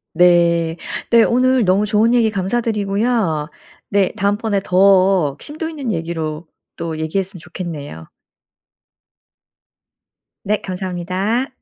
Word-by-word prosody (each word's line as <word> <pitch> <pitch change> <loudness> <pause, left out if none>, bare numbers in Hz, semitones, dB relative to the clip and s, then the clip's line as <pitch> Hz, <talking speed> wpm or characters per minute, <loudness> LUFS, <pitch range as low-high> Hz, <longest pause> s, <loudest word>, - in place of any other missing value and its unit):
네. 170 -1 +3 0.3
네 230 -1 +6
오늘 255 0 +2
너무 195 +3 +2
좋은 220 +2 +3
얘기 235 -2 +3
감사드리고요. 200 -4 -1 0.4
네 200 -2 +2
다음번에 205 0 0
더 185 -5 +3
심도 310 +2 -6
있는 290 -7 -4
얘기로 165 -2 -4 0.3
또 165 -2 -5
얘기했으면 185 +4 -3
좋겠네요. 155 - -7 2.4
네 210 +1 0
감사합니다. 185 +6 -2
190 Hz, 235 characters per minute, -18 LUFS, 170-220 Hz, 2.4 s, 네